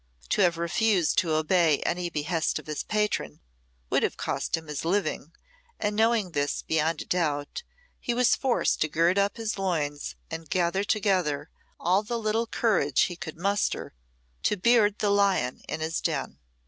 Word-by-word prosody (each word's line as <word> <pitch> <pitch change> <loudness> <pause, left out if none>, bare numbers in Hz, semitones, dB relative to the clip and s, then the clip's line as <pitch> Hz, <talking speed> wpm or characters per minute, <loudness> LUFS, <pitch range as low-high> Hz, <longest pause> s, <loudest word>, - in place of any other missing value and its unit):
To 210 - +2
have 175 -3 +3
refused 175 +1 +2
to 165 -3 0
obey 155 -1 +3
any 175 0 -1
behest 160 +1 -1
of - - -8
his 155 -1 -3
patron 210 - -1 0.5
would - - +3
have - - -1
cost - - -1
him 160 - -9
his 150 -2 -5
living, 170 -3 -1 0.5
and 210 0 -1
knowing 220 -3 +2
this 145 -2 -1
beyond 160 0 0
a - - -22
doubt, 150 - -1 0.4
he 240 - -2
was 250 0 +4
forced 260 -3 +1
to 155 - +3
gird 170 +5 +2
up 200 +2 +1
his 220 -3 -3
loins 150 -6 -2 0.2
and 160 -1 -6
gather 185 +2 +1
together 185 -9 0 0.3
all 185 +3 +2
the 235 +3 -3
little 225 +1 0
courage 185 - +2
he 175 - +1
could 160 -1 -7
muster 200 - -1 0.5
to 210 - +1
beard 210 0 +4
the 205 - +1
lion 195 -11 +2
in 155 - -3
his 160 +1 -2
den. - - -2
180 Hz, 170 wpm, -27 LUFS, 155-205 Hz, 0.5 s, was